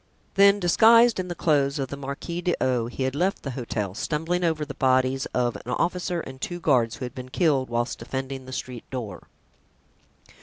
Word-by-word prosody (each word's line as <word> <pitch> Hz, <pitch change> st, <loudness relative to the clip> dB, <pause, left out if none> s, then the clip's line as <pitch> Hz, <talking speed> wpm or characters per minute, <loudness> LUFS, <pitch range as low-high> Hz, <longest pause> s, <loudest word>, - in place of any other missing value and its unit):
Then, 200 Hz, +1 st, +6 dB
disguised 225 Hz, +5 st, +5 dB
in 185 Hz, -, -2 dB
the 175 Hz, -, -4 dB
clothes 140 Hz, -4 st, +2 dB
of 135 Hz, -2 st, -3 dB
the -, -, -5 dB
Marquis 140 Hz, +5 st, -5 dB
d'O——, 130 Hz, -9 st, 0 dB
he 130 Hz, +2 st, -4 dB
had 130 Hz, 0 st, -1 dB
left 180 Hz, +7 st, 0 dB
the 140 Hz, -, -4 dB
hotel, 115 Hz, -6 st, -3 dB
stumbling 160 Hz, -, -1 dB
over 160 Hz, -3 st, 0 dB
the 145 Hz, -, -7 dB
bodies 130 Hz, 0 st, +2 dB
of 120 Hz, -1 st, -1 dB
an 125 Hz, -, -4 dB
officer 175 Hz, +1 st, -1 dB
and 130 Hz, -2 st, -10 dB
two 175 Hz, +4 st, -4 dB
guards 125 Hz, -8 st, +2 dB
who 130 Hz, -, -5 dB
had 125 Hz, -, -7 dB
been 130 Hz, -1 st, -8 dB
killed 140 Hz, -4 st, +1 dB
whilst 120 Hz, +1 st, -2 dB
defending 130 Hz, 0 st, -5 dB
the -, -, -8 dB
street 125 Hz, -2 st, -6 dB
door. 115 Hz, -8 st, -6 dB
135 Hz, 190 wpm, -25 LUFS, 130-175 Hz, -, Then